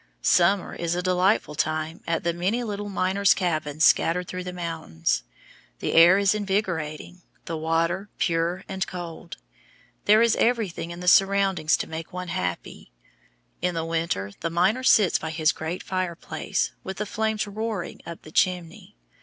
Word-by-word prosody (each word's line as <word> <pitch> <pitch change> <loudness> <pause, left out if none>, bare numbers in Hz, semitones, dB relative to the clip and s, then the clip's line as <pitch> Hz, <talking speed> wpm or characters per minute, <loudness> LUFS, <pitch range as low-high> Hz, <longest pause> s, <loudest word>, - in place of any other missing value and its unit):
Summer 185 +2 +3
is 170 0 -2
a 180 - -2
delightful 185 -2 +2
time 155 +2 -2
at 165 -1 -1
the 170 0 0
many 190 +8 -1
little 205 -2 -4
miners' 195 +1 +2
cabins 155 -4 0
scattered 180 +2 +3
through 185 0 -5
the 180 - -5
mountains. 160 - -2 0.6
The - - -3
air 170 +3 +7
is 200 0 +3
invigorating, 180 -5 -3 0.2
the 165 - -4
water 165 +5 -1
pure 170 +2 0
and 190 0 -3
cold. 170 -2 -8 0.7
There 215 +2 +6
is 235 - +3
everything 220 -8 0
in 170 +1 -8
the 180 - -6
surroundings 195 -4 +4
to - - -4
make 160 0 -7
one 180 0 -6
happy. 90 - -4 0.7
In 180 -1 0
the 165 -1 -2
winter 165 - -2
the 165 - -2
miner 185 +9 +2
sits 210 -7 +4
by 160 - -4
his 160 -1 +2
great 160 +3 -5
fireplace, 185 -3 -2
with 190 -1 -6
the 210 - -2
flames 220 +1 -1
roaring 210 -2 -4
up 170 -1 -9
the 155 - -12
chimney. 175 - -1
180 Hz, 160 wpm, -25 LUFS, 165-195 Hz, 0.7 s, air